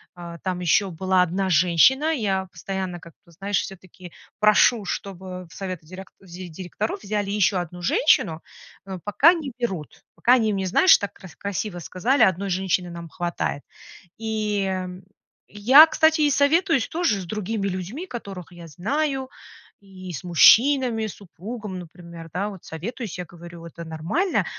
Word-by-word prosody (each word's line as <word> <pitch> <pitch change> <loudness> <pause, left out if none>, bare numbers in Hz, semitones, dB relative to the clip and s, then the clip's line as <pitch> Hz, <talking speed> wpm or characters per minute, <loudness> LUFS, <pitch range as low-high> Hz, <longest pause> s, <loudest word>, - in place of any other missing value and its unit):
а, 170 -1 -9
там 185 0 -3
еще 180 +3 +2
была 185 +2 +1
одна 190 +2 -1
женщина. 185 - +4
Я 195 -8 -1
постоянно 190 -2 -5
как-то, 170 +1 -18
знаешь, 195 +2 -1
все-таки 185 -2 -11 0.3
прошу, 215 +1 +4
чтобы 185 -1 -6
в - - -16
советы 185 -5 -6
дерек 185 +2 -10
директоров 185 +3 -6
взяли 205 -1 -2
еще 205 -1 +2
одну 175 0 -5
женщину, 170 - +2 0.4
но 190 -2 -7
пока 240 - +5
не 290 -7 -5
берут. 190 - -5
Пока 245 - +4
они 220 -4 +1
мне, 190 -1 -2
знаешь, 370 - +6
так 205 -2 -5
кра 190 - -13
красиво 200 -2 -4
сказали: 225 - 0
"1 190 +2 +1
женщины 180 -1 0
нам 170 -1 -8
хватает". 175 -5 -3 0.6
И, 215 -3 -1
э, 185 -1 -3 0.6
я, 255 +9 +7
кстати, 315 0 +3
и 295 - +4
советуюсь 285 0 +2
тоже 325 - 0
с - - -7
другими 210 +1 -3
людьми, 195 - -5
которых 195 - -8
я 170 -1 -11
знаю, 265 - -2 0.5
и 185 -2 -10
с 150 - -6
мужчинами, 230 - +5
с 210 - -8
супругом, 200 +1 -8
например, 170 -1 -11
да. 200 +3 -2
Вот 195 -4 -11
советуюсь, 205 +5 -6
я 180 - -5
говорю: 170 0 -12
"Это 170 0 -9
нормально?" 165 - -1
190 Hz, 155 wpm, -23 LUFS, 175-225 Hz, 0.6 s, я